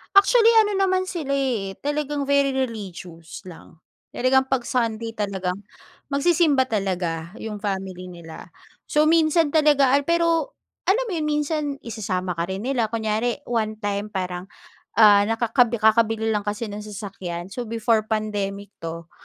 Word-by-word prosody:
Actually, 455 +3 +6
ano 420 -1 +3
naman 375 -1 +1
sila 315 -7 -4
eh, 250 -8 0
talagang 290 -1 -2
very 280 -1 +3
religious 190 -10 -5
lang. 165 -2 -13 0.3
Talagang 265 +1 +3
'pag 250 -3 0
Sunday 230 -2 -1
talagang, 195 -2 -3 0.5
magsisimba 285 -2 +3
talaga 180 -6 -2
yung 215 -1 -6
family 190 -2 -4
nila. 170 -2 -11 0.4
So, 300 +1 +4
minsan 320 -1 +3
talaga 285 -3 +5
al 285 - +2
pero 335 - +1 0.3
alam 465 +6 +1
mo 395 - -3
yun, 315 - -1
minsan 300 +1 0 0.2
isasama 185 -7 -3
ka 170 - -1
rin 195 +6 -4
nila. 235 -5 0
Kunyari 225 +2 -1
one-time 215 -3 -2
parang, 180 -2 -3 0.5
ah, 205 -2 +6
nakakabi 230 +1 +1
kakabili 220 0 +3
lang 210 -1 -1
kasi 210 +1 -3
ng 210 +1 -7
sasakyan, 190 -4 -6
so, 240 +4 -5
before 220 -1 +1
pandemic 205 -2 -3
'to, 165 +1 -7
225 Hz, 140 wpm, -23 LUFS, 200-280 Hz, 0.5 s, Actually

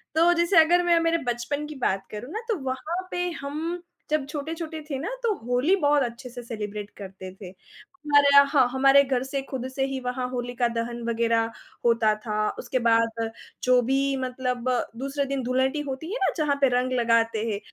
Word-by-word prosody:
तो 335 +2 +5
जैसे 345 +1 +2
अगर 350 +2 +3
मैं 345 -1 +4
मेरे 330 0 +2 0.2
बचपन 280 +5 -4
की 305 - -8
बात 195 0 0
करूँ 220 +6 -7
ना 440 - -3
तो 445 - +1
वहाँ 325 +8 -4
पे 355 0 -1
हम 315 +5 -4 0.3
जब 305 -3 +1
छोटे-छोटे 315 +2 -5
थे 275 - -2
ना, 325 +9 -3
तो 455 -2 +2
होली 250 +9 +2
बहुत 290 0 +4
अच्छे 240 +1 -6
से 245 0 -8
सेलिब्रेट 210 -3 -5
करते 190 -1 -9
थे। 190 -1 -10
हमारे 290 - 0
यहाँ 280 0 +9
हाँ, 270 -3 +4
हमारे 270 +2 +5
घर 260 -2 0
से 270 +1 -3
खुद 260 -2 -4
से 270 - +1
ही 270 -1 -3
वहाँ 250 0 -3
होलिका 245 -1 -1
दहन 235 0 -3
वग़ैरह 230 0 +1 0.4
होता 230 -2 +4
था, 215 0 -2
उसके 255 +1 -2
बाद 230 0 +2 0.3
जो 250 0 +5
भी 270 +3 +1
मतलब 255 -1 -2 0.3
दूसरे 275 +1 -2
दिन 275 -1 -2
धुलेंडी 260 +4 +1
होती 275 +2 -5
है - - -1
ना - - +2
जहाँ 300 -3 +1
पर 270 -2 +4
रंग 255 +1 0
लगाते 230 -1 +2
हैं, 200 - -2
260 Hz, 195 wpm, -25 LUFS, 235-295 Hz, 0.4 s, यहाँ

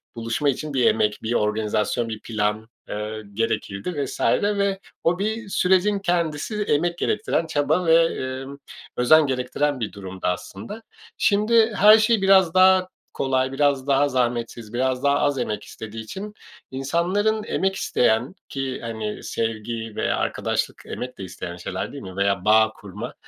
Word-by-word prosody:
buluşma 115 +5 -1
için 150 +2 -3
bir 130 -2 +2
emek, 105 -1 +2
bir 115 - -1
organizasyon, 105 +1 0
bir 110 -1 -5
plan, 110 0 -2 0.2
ııı, 105 +1 -4
gerekirdi 115 - -2
vs. - - -7 0.2
Ve 200 -1 0 0.2
o 175 +2 +2
bir 220 +1 -2
sürecin 190 +2 +2
kendisi 175 +3 -1
emek 170 0 0
gerektiren, 165 - 0
çaba 155 +4 +1
ve, 165 0 +6 0.4
ııı, 140 +1 -10 0.4
özen 150 +5 +5
gerektiren 130 +2 -1
bir 110 - -3
durumdu 95 -2 -6
aslında. 100 - -5 0.4
Şimdi 220 +2 +3
her 210 +2 +8
şey 220 -1 +3
biraz 190 -3 +5
daha 185 0 +5 0.3
kolay, 130 -1 0
biraz 140 -1 +1
daha 140 +1 +3
zahmetsiz, 120 -3 -2
biraz 130 +1 0
daha 140 0 +3
az 145 -2 +1
emek 105 -4 -3
istediği 110 0 -8
için 200 - -7 0.4
insanların 180 +11 0
emek 190 0 -1
isteyen 120 -8 +1
ki, 135 -1 -3
hani, 110 -2 -5
sevgi 115 0 -3
veya - - 0
arkadaşlık - - -2
emek 125 0 -6
de 95 - -7
isteyen 90 -1 -7
şeyler, 95 +1 -4
değil 140 - -8
mi? 95 -1 -9
Veya 100 -2 +1
bağ 110 +1 +5
kurma, 100 -3 -8
135 Hz, 150 wpm, -23 LUFS, 110-180 Hz, 0.4 s, her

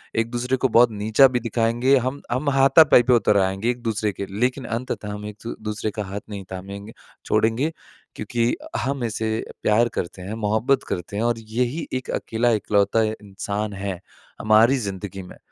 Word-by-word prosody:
एक-दूसरे 120 +3 0
को 130 - +2
बहुत 120 0 +5
नीचा 110 +6 +4
भी 125 -1 -1
दिखाएँगे, 120 +3 +2
हम 130 +3 -2
हम 140 +4 0
हाथापाई 135 -1 +6
पे 125 +1 +3
उतर 105 -3 +3
आएँगे 95 +3 +1
एक-दूसरे 115 -3 -1
के, 100 - -5
लेकिन 130 +2 0
अंततः 115 -2 -4
हम 105 0 -7
एक 105 -1 -8
द - - -4
दूसरे 105 0 -3
का 105 - -4
हाथ 100 +2 -6
नहीं 100 -2 -6
थामेंगे 100 +3 -8 0.3
छोड़ेंगे 120 +8 +1 0.4
क्योंकि 120 0 0 0.2
हम 130 +1 -2
इसे 110 -1 -2 0.3
प्यार 115 +3 +4
करते 90 +2 -4
हैं, 95 +4 -6
मोहब्बत 110 +5 +1
करते 90 +3 -4
हैं। 110 - 0
और 120 -1 0
यही 120 +7 -2
एक 130 0 -3
अकेला, 115 +2 0
एकलौता 105 0 +2
इंसान 105 -1 -4
है 95 -2 -4 0.4
हमारी 110 +5 +5
ज़िंदगी 100 -3 -5
में 90 - -12
110 Hz, 170 wpm, -23 LUFS, 105-125 Hz, 0.4 s, हाथापाई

